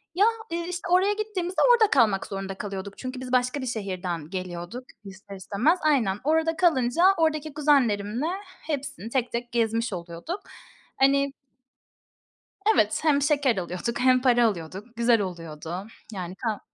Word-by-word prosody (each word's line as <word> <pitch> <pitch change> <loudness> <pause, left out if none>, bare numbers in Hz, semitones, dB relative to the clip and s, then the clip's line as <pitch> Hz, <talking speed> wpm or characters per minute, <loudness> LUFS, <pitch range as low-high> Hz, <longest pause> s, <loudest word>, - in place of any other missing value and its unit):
Ya, 395 +3 +5 0.3
ııı, 340 0 -2
işte, 360 +1 -5
oraya 380 +3 +4
gittiğimizde 395 -4 -2
orada 440 -3 +4
kalmak 220 -8 +3
zorunda 195 -1 -5
kalıyorduk 200 -1 -6
çünkü 255 0 -6
biz 255 -1 -6
başka 250 +2 +1
bir - - -4
şehirden 185 -8 -4
geliyorduk, 185 +5 -6 0.2
ister 200 0 -11
istemez. 225 - +1
Aynen, 240 -11 +2
orada 320 +2 +2
kalınca 320 -3 +2
oradaki 310 -2 0
kuzenlerimle 250 -5 +2 0.4
hepsini 270 - -5
tek 250 -1 -1
tek 240 0 -4
gezmiş 230 -1 0
oluyorduk. 170 - -6 0.6
Hani 275 +1 +3 1.4
Evet, 215 - +2
hem 290 -3 +3
şeker 280 -6 +2
alıyorduk 180 +6 -3
hem 255 0 +4
para 240 -2 +4
alıyorduk. 200 +4 -4
Güzel 235 -2 +3
oluyordu. 170 +1 -6 0.3
Yani 185 -2 -5
kah 215 0 -3
240 Hz, 140 wpm, -26 LUFS, 195-290 Hz, 1.4 s, Ya